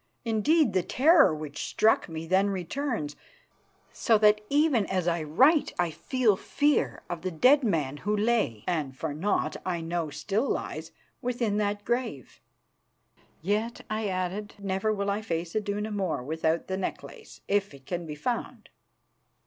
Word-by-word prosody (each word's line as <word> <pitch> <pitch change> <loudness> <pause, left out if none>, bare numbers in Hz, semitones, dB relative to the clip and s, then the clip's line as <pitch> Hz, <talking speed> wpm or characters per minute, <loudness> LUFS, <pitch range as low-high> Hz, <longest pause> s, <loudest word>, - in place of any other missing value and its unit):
Indeed, 230 - +3
the 185 - +3
terror 295 - +5
which 150 -1 -6
struck 220 -4 +2
me 160 0 -5
then 190 +4 +3
returns, 195 - -3 0.8
so 225 - +3
that 210 0 +4
even 285 -7 +3
as 185 -2 -1
I 170 -1 +1
write 265 - +3
I 175 -2 +1
feel 225 - +1
fear 290 +9 0
of 175 -2 -5
the 185 - -2
dead 255 - +4
man 150 - 0
who 210 +7 -1
lay, 210 - +1
and 150 -7 -2
for 155 0 -3
aught 205 - 0
I 180 -2 -2
know 165 -1 -2
still 205 - -1
lies, - - -3 0.3
within 240 -4 -1
that 205 -1 -1
grave. 240 - -3 1.0
"Yet," 215 +5 -1
I 215 0 -1
added, 185 +2 -3
"never 200 +1 -1
will 200 -1 -1
I 205 +2 -1
face 170 -4 -3
Iduna 210 0 -2
more 190 -10 -2
without 160 +3 -1
the 190 - -3
necklace, 440 - -7
if 200 0 +1
it 135 -2 -15
can 175 0 -4
be 150 - -5
found." 235 +11 -4
200 Hz, 155 wpm, -28 LUFS, 165-225 Hz, 1.0 s, terror